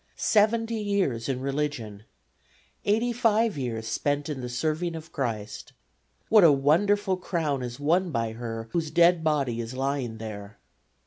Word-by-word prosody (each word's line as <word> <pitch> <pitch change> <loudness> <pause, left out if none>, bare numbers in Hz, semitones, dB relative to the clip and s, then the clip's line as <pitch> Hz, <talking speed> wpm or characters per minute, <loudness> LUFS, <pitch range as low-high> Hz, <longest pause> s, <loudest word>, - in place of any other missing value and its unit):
Seventy 225 +1 +2
years 185 - -1
in 130 -1 -2
religion; 135 -7 -3 0.8
85 225 0 +2
years 120 -5 -3
spent 145 +6 -1
in 140 -4 -4
the 125 - -5
serving 155 +7 -1
of 160 0 -9
Christ. 110 -6 -4 0.5
What 215 -3 +6
a 165 - +8
wonderful 185 +8 +2
crown 160 -7 -2
is 120 +1 -6
won 175 +5 +2
by 115 -6 -1
her 115 0 -6
whose 165 -3 -1
dead 170 +1 +4
body 140 -7 0
is 115 +2 -7
lying 135 -4 -2
here! 105 -2 -8
145 Hz, 140 wpm, -26 LUFS, 120-180 Hz, 0.8 s, a